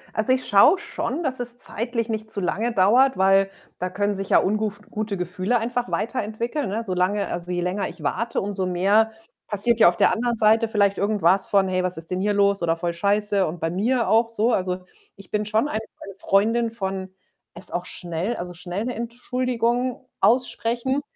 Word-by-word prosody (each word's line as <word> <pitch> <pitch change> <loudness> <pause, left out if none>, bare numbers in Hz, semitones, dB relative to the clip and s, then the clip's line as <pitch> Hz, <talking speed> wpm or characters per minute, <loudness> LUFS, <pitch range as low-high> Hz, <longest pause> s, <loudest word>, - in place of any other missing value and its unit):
Also, 220 +3 +1
ich 255 0 +1
schaue 205 - +6
schon, 340 - -4
dass 260 -3 -2
es 245 0 -2
zeitlich 230 -1 -3
nicht 220 -1 -4
zu 200 - -1
lange 220 +6 -1
dauert, 230 +6 +4
weil 195 +1 +4 0.3
da 180 +1 -2
können 205 +2 -1
sich 195 -1 -5
ja - - +5
unguf 210 0 0
gute 215 -2 -3
Gefühle 185 +6 -1
einfach 240 +2 -2
weiterentwickeln, 235 +4 -2
ne? 220 +4 -2
Solange 190 +1 0
also, 175 +1 -5
je 175 0 -1
länger 180 +3 -2
ich 170 -2 -12
warte, 230 +11 -1
umso 195 -2 -2
mehr 200 +5 +3 0.4
passiert 220 +3 +1
ja 195 - +8
auf 175 - -3
der - - +4
anderen 235 +1 -1
Seite 220 +1 +4
vielleicht 200 -3 +1
irgendwas 200 -2 +2
von: 195 -2 +3
„Hey, 185 0 0
was 180 -1 -1
ist 165 +1 -5
denn 185 0 -1
hier 205 +1 +1
los?“, 200 -1 +2
oder: 165 -1 +1
„Voll 170 0 -3
scheiße“ 200 +2 +1
und 165 +3 -6
bei 165 +1 -1
mir 230 +6 +1
auch 225 +1 +3
so 230 +1 +1
Also, 185 -1 -2 0.3
ich 195 -1 -15
bin 210 0 0
schon 215 +6 +1
eine 220 - -2 0.2
eine 195 -1 -9
Freundin 225 +4 +2
von 190 -4 -4 0.5
es 175 - -5
auch 175 +1 -3
schnell 175 +6 -4
also, 180 -2 -6
schnell 180 +4 -5
‘ne 250 - -2
Entschuldigung 245 +1 -2
aussprechen. 245 +2 +1
210 Hz, 195 wpm, -23 LUFS, 185-235 Hz, 0.5 s, ja